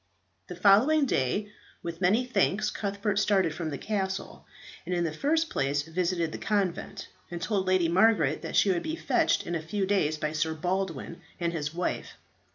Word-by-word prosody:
The 180 - -7
following 215 - +5
day, 200 - 0 0.3
with 170 0 -6
many 210 +7 +3
thanks 210 -2 +1
Cuthbert 200 0 -1
started 190 -5 +2
from 160 -1 -4
the 140 - -4
castle, 190 -1 -4 0.4
and 180 - -2
in 175 - +1
the 160 -2 -2
first 320 - 0
place 140 +2 0
visited 170 0 -1
the - - -6
convent, 200 -5 -2 0.2
and 175 - -5
told 190 +1 -1
Lady 185 -2 +3
Margaret 170 -5 +3
that - - -5
she 200 - +4
would 175 -2 0
be 320 - -3
fetched - - +1
in 175 - -4
a 165 - -1
few 190 +5 -2
days 185 -6 +1
by 155 0 -2
Sir 160 +1 -1
Baldwin 175 -1 -3 0.2
and 170 -1 -1
his 150 -3 -3
wife. 175 +2 -3
180 Hz, 180 wpm, -28 LUFS, 165-205 Hz, 0.4 s, following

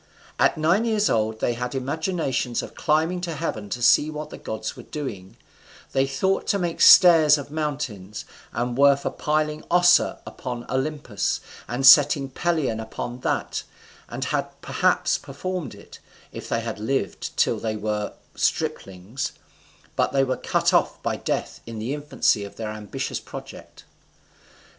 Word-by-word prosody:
At - - +3
nine 170 +8 +3
years 215 -2 +2
old 110 0 0
they 120 - +1
had 125 +2 -4
imaginations 135 -3 -1
of - - -9
climbing 160 +3 +1
to 170 -2 -4
heaven 115 -10 -4
to 120 +3 -4
see 150 +5 +5
what 150 0 -6
the - - -8
gods 110 0 -5
were - - -9
doing; 105 -11 -7 0.5
they 135 0 +2
thought 190 +9 0
to 200 - +2
make 175 -3 -2
stairs 160 -4 +8
of 145 0 -8
mountains, 140 -10 -4 0.3
and 120 0 -2
were 140 +1 +6
for 140 - -4
piling 150 0 -1
Ossa 175 0 +4
upon 120 -2 -6
Olympus, 130 -5 -1 0.3
and 125 +3 -2
setting 140 0 +7
Pelion 155 -8 0
upon 120 +2 -6
that, - - -2 0.5
and - - -4
had - - -3
perhaps - - +1
performed 150 - -5
it, 100 - -14 0.3
if - - -8
they 115 - 0
had 115 -2 -5
lived 135 +6 -3
till - - +2
they 110 -1 -2
were 105 -1 -3 0.2
striplings; 95 +7 -2 0.6
but - - +1
they 135 -1 +3
were 130 -1 0
cut - - 0
off - - +2
by - - 0
death - - -3
in 115 -1 -7
the 115 +6 -3
infancy 145 -7 +1
of 100 - -9
their 110 -1 -5
ambitious 105 -1 -4
project. - - -11
135 Hz, 155 wpm, -24 LUFS, 115-155 Hz, 0.6 s, stairs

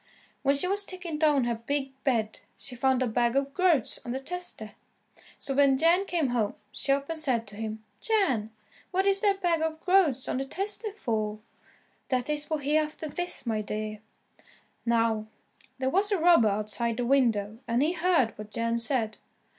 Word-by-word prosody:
When 280 0 +3
she 280 +6 0
was 400 +2 0
taking 355 -5 -6
down 300 -4 +4
her 240 0 0
big 270 +4 -2
bed 225 -6 0 0.2
she 255 - -3
found 260 +1 +2
a - - 0
bag 235 +2 +1
of 275 0 0
groats 335 - +2
on - - -8
the 265 - -2
tester. 305 -8 -5 0.7
So 275 - -3
when 275 -1 +4
Jan 340 +6 +4
came 325 -6 0
home, 225 -4 0 0.2
she 275 - -2
up 275 0 +1
and 325 -1 -3
said 250 -7 +1
to 205 0 -11
him, 220 0 -5 0.2
"Jan, 275 - +1 0.4
what 380 +1 +1
is 395 0 +4
that 395 -2 +1
bag 335 -2 +2
of 320 0 -1
groats 350 -9 +3
on - - -1
the 270 - -2
tester 410 +7 -3
for?" 220 - -2 0.7
"That 255 +2 0
is 295 0 0
for 310 +1 -1
Hereafterthis, 305 +3 -2
my 220 -2 0
dear." 215 0 -4 0.9
Now, 225 -2 +2 0.5
there 260 0 -1
was 405 +5 +2
a 400 - +3
robber 335 -9 +6
outside 215 +3 -1
the 245 - -1
window, 225 -5 +2
and 235 +3 +2
he 315 - +2
heard 335 -10 +2
what 210 0 -7
Jan 230 +2 -1
said. 230 -3 0
270 Hz, 180 wpm, -28 LUFS, 230-330 Hz, 0.9 s, robber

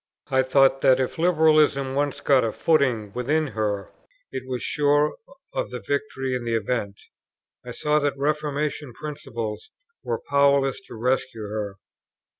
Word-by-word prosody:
I 130 - +4
thought 135 +1 +3
that 130 0 +5
if 130 +4 -2
Liberalism 155 -5 +3
once 145 0 -1
got 135 -3 +4
a 115 - 0
footing 125 -11 +1
within 145 +5 0
her, 105 -3 -2 0.4
it - - -4
was 125 -1 -3
sure 145 0 +2 0.4
of - - -2
the - - -5
victory 410 - -2
in 125 -1 -2
the 115 -1 -1
event. 105 -2 -2 0.6
I - - -8
saw 150 0 +1
that 145 -1 -1
Reformation 150 -1 -2
principles 135 - -6 0.3
were - - -3
powerless 140 -1 +3
to - - -10
rescue 125 -1 -1
her. 105 -1 -4
135 Hz, 145 wpm, -24 LUFS, 120-150 Hz, 0.6 s, that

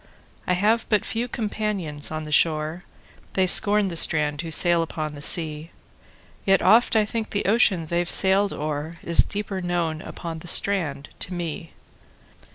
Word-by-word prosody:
I 180 - +2
have 215 +5 +1
but 210 -2 +1
few 235 +2 -3
companions 205 -10 -3
on 155 0 -5
the 155 - -8
shore:They 160 +4 -1
scorn 205 +2 +4
the 170 - -6
strand 150 -2 0
who 165 - -7
sail 170 +1 +3
upon 155 -2 -4
the 145 - -10
sea; 155 0 0 0.7
Yet 195 -1 +2
oft 230 +1 +4
I 215 -1 +4
think 225 +1 -4
the 205 - -3
ocean 195 -5 +3
they've 175 +2 -2
sailed 195 +1 +3
o'erIs 155 +3 0
deeper 200 -2 -5
known 170 -3 -2
upon 165 -2 -7
the 175 - -12
strand 160 -8 0
to 180 - -4
me. 165 -1 -6
175 Hz, 155 wpm, -23 LUFS, 155-200 Hz, 0.7 s, scorn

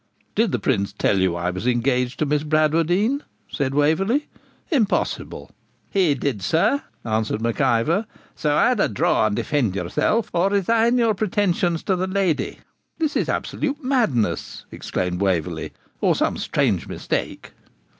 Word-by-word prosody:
'Did 220 -2 +2
the - - +1
Prince 100 -6 0
tell 100 -1 +1
you 95 -2 +1
I 85 +1 -1
was 95 +6 -4
engaged 125 +1 +1
to 155 - 0
Miss 150 0 +1
Bradwardine?' 165 - +2 0.3
said 135 -2 -1
Waverley. 195 - +2 0.4
'Impossible.' 225 -10 -1 0.4
'He 180 -8 +3
did, 130 -6 -2
sir,' 165 - +2 0.2
answered 110 -1 -1
Mac 115 0 -1
Ivor; 165 - +2 0.3
'so, 150 -1 0
either 245 +1 +3
draw 110 +1 +2
and 105 - -1
defend 120 -9 0
yourself 100 - 0
or 175 +3 +2
resign 225 +5 +2
your 230 -2 +3
pretensions 185 -4 0
to 190 - +1
the 185 +1 -1
lady.' 190 -4 0 0.4
'This 315 -3 -1
is - - 0
absolute 290 +1 -2
madness,' 225 - 0
exclaimed 90 0 -3
Waverley, 90 -6 -1 0.3
'or - - +3
some - - 0
strange - - 0
mistake!' - - -4
155 Hz, 145 wpm, -22 LUFS, -, 0.4 s, He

